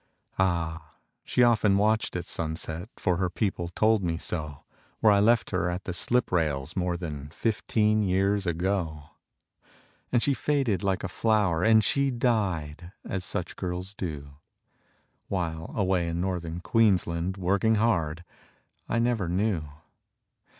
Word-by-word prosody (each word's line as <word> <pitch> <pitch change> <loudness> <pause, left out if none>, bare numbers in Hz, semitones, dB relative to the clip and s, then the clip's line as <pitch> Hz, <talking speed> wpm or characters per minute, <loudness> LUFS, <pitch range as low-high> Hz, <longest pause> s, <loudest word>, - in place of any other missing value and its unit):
Ah! 80 -4 -1 0.3
she 125 - +2
often 110 -4 +4
watched 110 +1 +1
at 90 - -3
sunset 80 +3 -4
For 90 -2 0
her 90 -1 0
people 90 -2 -2
told 110 +4 +2
me 85 -2 -1
so 75 -4 -4 0.4
Where 110 -2 +5
I 100 - +4
left 115 +3 +3
her 90 -2 0
at 90 +2 -4
the 90 - -4
slip 120 +7 +1
rails 75 -3 0
More 90 -2 -1
than 75 -5 -6
fifteen 110 +3 +1
years 95 0 +1
ago. 85 -3 -1 1.1
And 120 -2 +2
she 140 - +3
faded 135 -10 0
like 95 -1 -1
a - - -1
flower, 100 -4 +1
And 110 0 +5
she 140 +6 +2
died, 95 - -1 0.2
as 95 -1 -3
such 90 -2 -3
girls 90 +1 -4
do, 70 -7 -6 0.9
While, 80 -4 -3
away 95 -4 +1
in 85 0 -2
Northern 90 -2 -3
Queensland, 95 -5 +1
Working 100 +4 +2
hard, 85 -7 0 0.7
I - - 0
never 115 -6 +1
knew. 95 -3 0
95 Hz, 140 wpm, -27 LUFS, 85-105 Hz, 1.1 s, Where